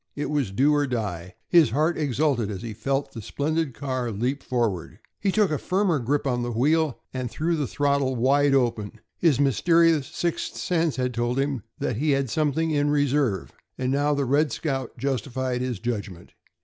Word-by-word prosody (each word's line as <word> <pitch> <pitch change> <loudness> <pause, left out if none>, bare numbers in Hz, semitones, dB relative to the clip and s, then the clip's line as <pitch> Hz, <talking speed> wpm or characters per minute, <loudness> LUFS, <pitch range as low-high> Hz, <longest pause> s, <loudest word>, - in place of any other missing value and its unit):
It 145 +1 -3
was 145 -8 0
do 135 +10 +3
or 145 -1 +2
die. 95 -8 -4
His 165 -7 +5
heart 155 +8 +1
exulted 140 -5 0
as 95 -3 -5
he 115 -2 -5
felt 135 +6 -2
the 115 - -7
splendid 145 +4 -2
car 130 -4 -2
leap 125 +6 -2
forward. 115 -9 -2 0.2
He 195 - +1
took 210 -3 +2
a 150 - 0
firmer 185 -4 +1
grip 140 +5 -1
on 125 -3 0
the 120 0 -2
wheel 150 +4 +1
and 130 -2 -3
threw 165 +7 -1
the 150 -4 -1
throttle 140 -1 +1
wide 140 +3 +3
open. 115 -5 0 0.2
His 155 -7 +3
mysterious 165 +2 +3
"sixth 170 -1 -3
sense" 165 -3 0
had 125 -1 -1
told 120 +2 -1
him 135 -3 0 0.2
that 115 - -2
he 150 +5 0
had 135 -4 -2
something 155 +1 +1
in 145 -1 +1
reserve, 145 - +1 0.3
and 130 0 -1
now 145 +2 +2
the 140 -1 0
"Red 145 +2 +2
Scout" 135 -3 -3
justified 130 0 -2
his 125 -3 -2
judgment. 100 -6 -5
135 Hz, 185 wpm, -25 LUFS, 120-150 Hz, 0.3 s, His